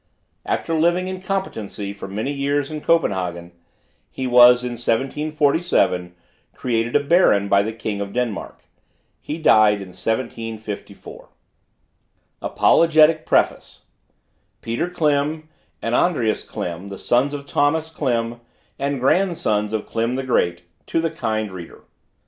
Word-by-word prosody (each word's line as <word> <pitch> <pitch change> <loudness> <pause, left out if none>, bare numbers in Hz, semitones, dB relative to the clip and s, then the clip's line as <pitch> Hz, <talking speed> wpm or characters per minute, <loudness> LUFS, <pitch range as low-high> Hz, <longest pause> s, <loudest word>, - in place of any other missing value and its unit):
After 165 - -1
living 175 +3 +2
in 185 0 -5
competency 110 - -4
for 100 - -8
many 110 +8 -3
years 140 +1 -1
in 155 -1 -5
Copenhagen, 90 - 0 0.6
he 130 - -5
was, 125 0 +7
in 125 - -3
1747, 135 - 0 0.4
created 120 -1 -1
a - - +6
baron 140 - +4
by 100 0 +4
the 110 +2 -3
king 110 -2 -4
of 100 0 -4
Denmark. 120 -3 -4 0.6
He 150 - -5
died 110 -9 +5
in 95 -2 -8
1754. 110 +1 -5 1.1
APOLOGETIC 160 -1 +4
PREFACE. - - 0 0.8
PETER 120 +10 -2
KLIM 155 -2 0 0.4
AND 115 - -1
ANDREAS 125 -7 +1
KLIM, 90 +3 -6
THE 100 - -7
SONS 130 +8 +1
OF 140 -1 -7
THOMAS 155 +3 +1
KLIM, 120 -6 -2 0.4
AND 140 0 -1
GRANDSONS 135 - +1
OF 110 -1 -2
KLIM 115 +2 -1
THE 135 - -2
GREAT, 85 -9 0 0.2
TO - - 0
THE 165 -1 -1
KIND 110 -9 -2
READER. 90 -3 -10
125 Hz, 125 wpm, -21 LUFS, 105-155 Hz, 1.1 s, was